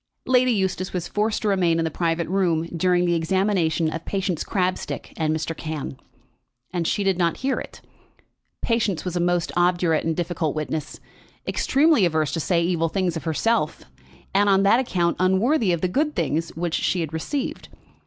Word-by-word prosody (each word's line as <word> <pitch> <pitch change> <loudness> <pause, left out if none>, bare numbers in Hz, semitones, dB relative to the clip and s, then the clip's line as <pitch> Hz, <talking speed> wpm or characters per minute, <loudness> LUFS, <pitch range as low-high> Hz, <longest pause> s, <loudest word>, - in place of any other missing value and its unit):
Lady 255 0 +4
Eustace 190 -3 -1
was 175 -2 -2
forced 215 +2 -1
to - - +1
remain 180 -5 +2
in 165 - 0
the 160 - -2
private 165 0 -1
room 175 -4 +1
during 180 +1 +2
the 175 - +2
examination 170 -1 +1
of 165 +1 -4
Patience 190 -4 -2
Crabstick 185 -3 -2
and 155 -2 0
Mr. 160 +1 -2
Cann; 155 -4 -5 0.8
and 170 -2 -1
she 205 - 0
did 190 -2 +1
not 170 -2 +1
hear 270 - +1
it. - - -10 0.8
Patience 210 -8 0
was 180 -1 -3
a - - +1
most 175 0 +1
obdurate 175 -2 +2
and 165 0 -1
difficult 170 -3 -1
witness, 155 0 -4 0.5
extremely 295 -4 +3
averse 160 -4 +1
to 165 - -2
say 170 +1 +1
evil 165 -2 0
of 175 -5 0
herself, 165 +2 0 0.5
and 200 +1 +3
on 195 0 +4
that 200 +5 +5
account 175 -9 0
unworthy 190 - +2
of 170 -2 0
the 185 - +2
good 300 - 0
things 165 0 -1
which 170 0 -2
she 180 - +1
had 160 -1 -4
received. 265 - -3
175 Hz, 175 wpm, -23 LUFS, 165-195 Hz, 0.8 s, that